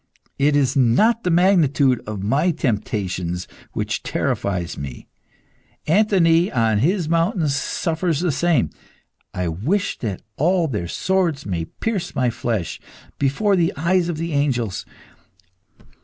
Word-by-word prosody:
It 145 +1 +3
is 140 -3 +2
not 140 - +3
the 180 - 0
magnitude 160 - +3
of 105 -3 -5
my 140 - +2
temptations 100 - -2 0.3
which - - -2
terrifies 90 -4 -2
me. 65 -3 -7 0.8
Anthony, 175 -2 +3
on 110 -3 +2
his 170 - +1
mountain, 170 +1 +1
suffers 160 +3 -1
the 175 -1 +1
same. 150 - +1 0.6
I 90 -1 -2
wish 130 - -1
that 105 -6 -4
all 170 +2 +2
their 105 - -3
swords 170 - 0
may 85 -4 -2
pierce 195 - -4
my 125 -3 +1
flesh, 110 -6 -3 0.4
before 145 +10 +2
the 170 -2 +1
eyes 175 +3 +1
of 165 - -3
the 165 0 -3
angels. 125 -8 -1
145 Hz, 125 wpm, -21 LUFS, 110-175 Hz, 0.8 s, It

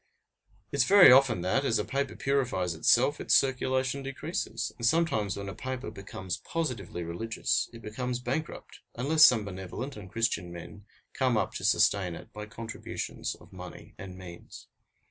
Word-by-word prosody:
It 140 - -3
is 125 - +4
very 195 -4 +9
often 130 -7 +5
that, 95 +10 +1
as 115 -5 +2
a 105 - -1
paper 140 0 -2
purifies 125 -11 0
itself, 125 - +3
its - - +3
circulation 130 0 +1
decreases, 135 -5 -4
and 120 - -11
sometimes 115 - +1
when 100 0 -5
a 95 - -5
paper 130 +5 -5
becomes 95 -2 -6
positively 125 - -4
religious, 85 +7 -1
it 115 -2 -12
becomes 125 +3 -3
bankrupt, 130 +6 -5 0.2
unless 155 +6 +4
some 115 -8 +6
benevolent 100 +8 -6
and 100 -3 -10
Christian 115 -5 -1
men 90 +4 -10 0.3
come 130 -4 +1
up - - -1
to - - -6
sustain 90 -4 +2
it - - -12
by 105 +1 -7
contributions 115 +1 -5
of - - -18
money - - -10
and 95 -1 -8
means. 90 -2 -11
115 Hz, 165 wpm, -29 LUFS, 100-135 Hz, 0.3 s, very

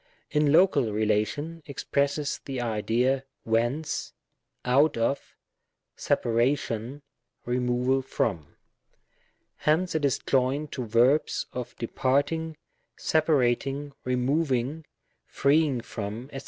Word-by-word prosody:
In 150 -1 +3
Local 150 - +4
relation, 110 +10 -1
expresses 140 +1 -1
the 135 -2 -4
idea 120 +3 +1 0.2
whence^ 120 +7 -1 0.5
out 140 +5 +4
of^ 115 +4 0 0.8
separation^ 120 +2 0 0.4
removal 125 +2 +1
from. 95 - -2 1.0
Hence 165 +4 +1
it 160 -2 -1
is 140 -4 +2
joined 135 +3 0
to 125 -3 -4
verbs 120 +7 +3
of 125 -1 -5
departing, 145 +7 0 0.4
separating, 140 -2 +1
removing, 135 +3 0 0.4
freeing 140 -3 +2
from, 115 +2 -6
<fec. 135 - -6
135 Hz, 90 wpm, -27 LUFS, 120-145 Hz, 1.0 s, Local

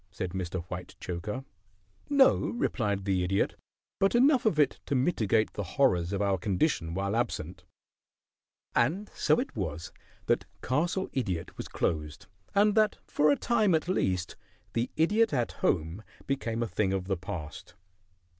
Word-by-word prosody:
said 90 0 -4
Mr. 90 -1 -3
Whitechoker. 90 +6 -6 0.6
"No," 280 -2 +6
replied 105 - -1
the 95 -2 +1
Idiot. 95 +2 +1 0.5
"But 195 +4 +3
enough 255 -1 +5
of 175 - +1
it 145 -3 +3
to 140 - 0
mitigate 115 - +2
the - - -3 0.2
horrors 90 -11 +3
of 100 0 0
our 100 -2 +1
condition 90 - 0
while 100 +2 -1
absent." 120 +1 -3 1.1
And 180 - +1
so - - +2
it 255 - -4
was 85 -5 -4 0.3
that - - +1 0.2
Castle 170 +8 0
Idiot 95 -11 -2
was - - -6
closed, 75 -2 -2 0.3
and 205 +1 +5
that 215 -1 +3
for 150 +1 +2
a 145 - +4
time 220 -7 +2
at 160 - -1
least 95 - 0 0.4
"The 120 +1 0
Idiot 210 +6 +3
at 120 -4 0
Home" 85 +2 0 0.2
became 120 -4 -1
a - - -2
thing 100 -3 0
of 95 -1 -2
the 95 0 0
past. 90 -4 -7
110 Hz, 150 wpm, -29 LUFS, -, 1.1 s, No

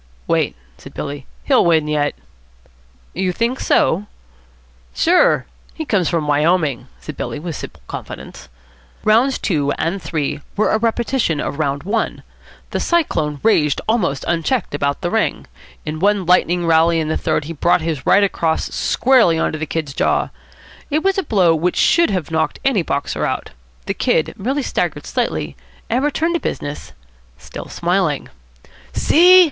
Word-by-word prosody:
"Wait," - - 0 0.2
said - - -13
Billy. 140 -1 -6 0.2
"He'll 265 -3 +4
win 160 -3 +3
yet." 150 -1 0 1.0
"You 185 -1 0
think 235 +7 -1
so?" 200 +6 +2 0.9
"Sure. - - +3 0.3
He 315 - -4
comes 195 - +1
from 165 -3 0
Wyoming," 150 -3 +1
said 155 - -8
Billy - - -4
with 160 +1 -5
simple - - -9
confidence. - - -9 0.5
Rounds 235 +5 +3
two 145 -7 0
and 175 +4 -2
three 150 -3 -2 0.2
were 215 - +2
a 220 - +2
repetition 230 - 0
of 145 - -3
round 140 -2 -1
one. 220 +4 -2 0.5
The - - -1
Cyclone 160 - 0
raged 150 -10 +3
almost 205 - 0
unchecked 175 - 0
about 140 0 -1
the 175 - -2
ring. 225 0 0 0.4
In 155 0 -4
one 200 0 +2
lightning 175 0 +3
rally 165 0 +4
in 155 - -1
the 160 - -1
third - - 0
he 165 - -5
brought 170 +3 +2
his 160 -4 -3
right 205 - +4
across 165 -5 0
squarely 245 -11 +3
on - - 0
to 155 - -5
the 155 - -3
Kid's 150 -3 -3
jaw. - - +1 0.6
It 310 +1 0
was 390 0 +2
a 375 - -5
blow 180 -6 +4
which 170 +3 0
should 335 -4 +4
have 185 -6 -2
knocked 160 0 0
any 260 -8 +3
boxer 140 -3 -2
out. - - -2 0.3
The - - -1
Kid - - +1
merely 265 +8 -2
staggered - - -2
slightly - - -2 0.4
and 250 +4 +1
returned 320 +3 0
to 340 - +1
business, 145 +1 -5 0.4
still 75 - -9
smiling. 175 -4 -1 0.6
"See!" 360 - +6
170 Hz, 160 wpm, -19 LUFS, 155-225 Hz, 1.0 s, See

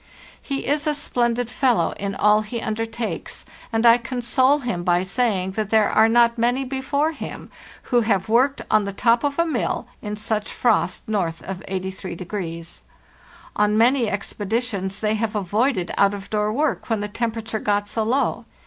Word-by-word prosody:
He 275 -1 -3
is 295 +2 0
a 300 - +2
splendid 245 -4 0
fellow 240 -11 +2
in 200 0 -4
all 210 0 +4
he 215 +2 -5
undertakes, 225 +1 -4 0.3
and 225 +1 +1
I 235 +1 +7
console 255 +3 +2
him 240 -11 -3
by 175 0 +2
saying 190 -2 0
that 210 +1 -3
there 220 -1 +3
are 220 +1 +5
not 235 0 +4
many 245 +3 +1
before 280 +4 -1
him 320 - -8 0.4
who 240 - +5
have 205 -4 +1
worked 255 +5 +2
on 215 -1 +4
the 200 - -4
top 235 +5 +2
of 285 -1 -1
a 335 - +3
mill 295 -8 -1 0.2
in 210 -1 -4
such 215 0 -3
frost 220 -6 +1
north 180 -6 -1
of 190 -1 -5
83°. 185 -2 -5 0.7
On 210 0 +2
many 240 0 +4
ex 200 -1 -3
peditions 205 -2 -2
they 215 0 +1
have 220 0 -2
avoided 205 0 0
out 200 0 +4
of 200 -1 -10
door 210 0 +1
work 290 +4 -1
when 220 -2 0
the 205 - -2
temperature 225 0 -3
got 205 0 0
so 220 - -2
low. 240 +6 0
220 Hz, 175 wpm, -22 LUFS, 200-245 Hz, 0.7 s, I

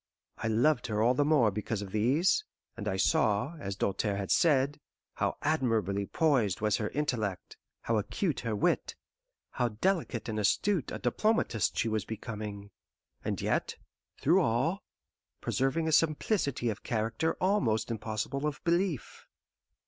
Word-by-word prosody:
I - - -2
loved 125 +4 +2
her 105 -2 -1
all 120 +2 +4
the 145 - +2
more 140 -8 +4
because 105 +1 -3
of 95 - -9
these, 140 - +2 0.3
and 105 -3 -6
I 95 -2 0
saw, 105 - +2
as 100 -6 -4
Doltaire 100 +1 -1
had 100 -1 -3
said, 145 -3 +3 0.3
how - - -1
admirably 115 - +1
poised 135 - +2
was 105 -1 +1
her 105 - -2
intellect, 115 -10 -2 0.3
how 115 -1 +1
acute 155 - -1
her 115 -2 -2
wit, 170 +12 0 0.6
how 125 - 0
delicate 125 - -1
and 110 -1 -2
astute 165 - +1
a - - -3
diplomatist 135 - +1
she - - +1
was 110 -2 0
becoming; 105 -2 -6 0.5
and - - -2
yet, - - 0 0.4
through 175 +7 +4
all, 160 - +1 0.6
preserving 135 +5 0
a - - +1
simplicity 150 - +1
of 105 - -7
character 115 +7 -1
almost 135 - +1
impossible 115 +6 -2
of 150 - -4
belief. 170 -4 -1
120 Hz, 145 wpm, -30 LUFS, 105-155 Hz, 0.6 s, all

